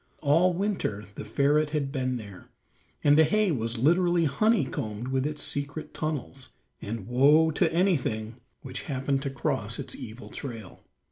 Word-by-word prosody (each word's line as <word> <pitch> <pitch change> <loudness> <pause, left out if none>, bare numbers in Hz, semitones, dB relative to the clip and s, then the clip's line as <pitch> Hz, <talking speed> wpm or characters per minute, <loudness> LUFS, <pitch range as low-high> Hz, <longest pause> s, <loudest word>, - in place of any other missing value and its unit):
All 165 +6 +4
winter 180 - -2
the - - -7
ferret 145 +7 +2
had 145 -3 -2
been 130 -2 -1
there, 100 -5 -11 0.5
and 145 0 +6
the - - +8
hay 210 +5 +2
was 115 -4 -2
literally 175 +5 +3
honeycombed 135 - 0
with 130 +1 0
its 150 0 -4
secret 145 +2 -3
tunnels, 140 -3 -4 0.3
and 105 -1 -5
woe 145 +6 +5
to 145 - +1
anything 125 - 0 0.3
which 130 -1 -6
happened 135 0 0
to 140 - -2
cross 135 -2 -2
its - - -6
evil 110 +4 -9
trail. 115 -5 -8
140 Hz, 150 wpm, -27 LUFS, 120-155 Hz, 0.5 s, the